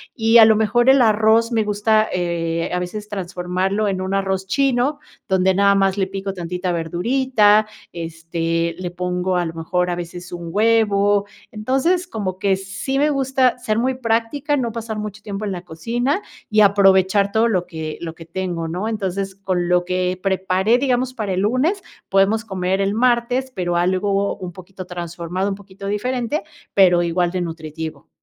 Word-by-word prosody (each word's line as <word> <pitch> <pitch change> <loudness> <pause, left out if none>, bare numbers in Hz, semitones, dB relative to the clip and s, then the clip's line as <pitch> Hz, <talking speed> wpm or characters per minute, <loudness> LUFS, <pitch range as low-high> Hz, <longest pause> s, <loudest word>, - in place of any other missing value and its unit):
y 225 -1 +4
a 220 - +10
lo 220 -1 +5
mejor 240 +3 +3
el 270 0 +6
arroz 225 +1 +3
me 225 -1 +2
gusta, 215 +1 +2
eh, 170 -2 -2
a 180 - 0
veces 205 +4 -5
transformarlo 190 +1 -2
en 190 -1 -1
un 190 +1 -3
arroz 190 -1 -1
chino, 275 +4 +1 0.3
donde 190 0 +3
nada 200 +1 +4
más 195 0 +2
le 190 -1 +1
pico 195 0 -4
tantita 180 0 -3
verdurita, 215 +5 +2 0.3
este, 165 0 -2
le 180 -1 -5
pongo 180 +1 -3
a 180 -2 +1
lo 165 - -5
mejor 180 +2 -1
a 175 - -1
veces 175 +1 -7
un 170 -1 -6
huevo, 205 -1 +3 0.3
entonces, 270 +12 0
como 190 - -4
que 195 0 +2
sí 195 +8 -4
me 295 +1 +3
gusta 265 -2 +1
ser 215 -3 -1
muy 255 +3 +1
práctica, 250 +5 0
no 235 -3 -1
pasar 225 -1 -5
mucho 210 0 -6
tiempo 205 0 -5
en 200 - -2
la 180 -2 -5
cocina, 240 - -2 0.3
y 215 0 +4
aprovechar 195 0 +4
todo 225 +2 +3
lo 180 -5 0
que 160 -2 -6
lo 165 -1 -6
que 165 - -12
tengo 170 -1 -3
¿no?, 180 +6 -3
entonces, 195 -3 -3
con 185 -3 -2
lo 180 0 +2
que 180 0 -1
preparé, 190 +3 +2
digamos, 255 -1 0
para 210 -6 -3
el 185 - 0
lunes, 270 - +1 0.3
podemos 195 +3 +3
comer 190 -2 -1
el 195 +1 0
martes, 245 +2 +1
pero 175 -5 -2
algo 195 +3 +1
un 180 -1 -6
poquito 185 +1 -10
transformado, 175 +2 -4
un 195 - -2
poquito 200 0 -12
diferente, 245 +7 -1 0.3
pero 180 -3 +5
igual 175 +1 +1
de 185 - -2
nutritivo. 160 -3 -6
195 Hz, 175 wpm, -20 LUFS, 180-225 Hz, 0.3 s, a